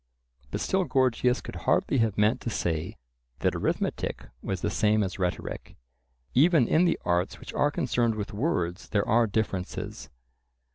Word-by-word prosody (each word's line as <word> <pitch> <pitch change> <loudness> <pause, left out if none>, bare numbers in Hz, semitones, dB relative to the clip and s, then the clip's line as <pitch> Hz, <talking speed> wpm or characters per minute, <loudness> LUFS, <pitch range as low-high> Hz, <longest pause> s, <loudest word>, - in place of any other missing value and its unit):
But - - -3
still 190 0 +1
Gorgias 125 -4 +2
could - - -8
hardly 135 - +1
have 110 -3 +1
meant 105 +4 +3
to - - -3
say 85 0 -2 0.4
that - - +2
arithmetic - - -2
was 95 -2 -3
the - - -1
same 105 0 +2
as 95 0 -4
rhetoric. 90 -1 -3 0.6
Even 150 -2 +5
in 165 +3 +4
the 170 - +1
arts 90 +1 0
which - - -9
are 145 - +2
concerned 120 -5 0
with 105 -1 -5
words 95 - -1
there 100 -1 +1
are 115 +1 +4
differences. 100 -3 -3
110 Hz, 155 wpm, -27 LUFS, 95-130 Hz, 0.6 s, Even